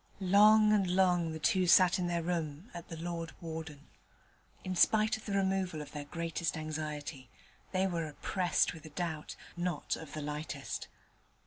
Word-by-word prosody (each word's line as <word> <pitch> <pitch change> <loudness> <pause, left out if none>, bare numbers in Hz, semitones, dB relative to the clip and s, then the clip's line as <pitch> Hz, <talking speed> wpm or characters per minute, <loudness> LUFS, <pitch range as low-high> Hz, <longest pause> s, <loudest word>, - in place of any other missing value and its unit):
Long 215 +1 +7
and 200 -3 +3
long 180 -3 +3
the 160 - -4
two 185 +3 +2
sat 180 +2 +6
in 180 - 0
their 170 -1 -1
room 165 +2 -3
at 170 -1 -8
the 165 - -7
'Lord 165 0 -4
Warden'. 160 -3 -7 0.8
In 185 0 -3
spite 215 +4 +4
of 220 - -10
the 200 - -2
removal 190 -4 0
of 150 - -8
their 145 -1 -6
greatest 165 +1 -3
anxiety, 150 -4 -5 0.4
they 190 0 +1
were 170 -4 -1
oppressed 175 +5 0
with 160 - -11
a 155 - -9
doubt, 160 -1 -4 0.2
not 175 -3 -2
of 160 -3 -10
the 155 - -4
lightest. 150 -1 -5
170 Hz, 170 wpm, -32 LUFS, 155-185 Hz, 0.8 s, Long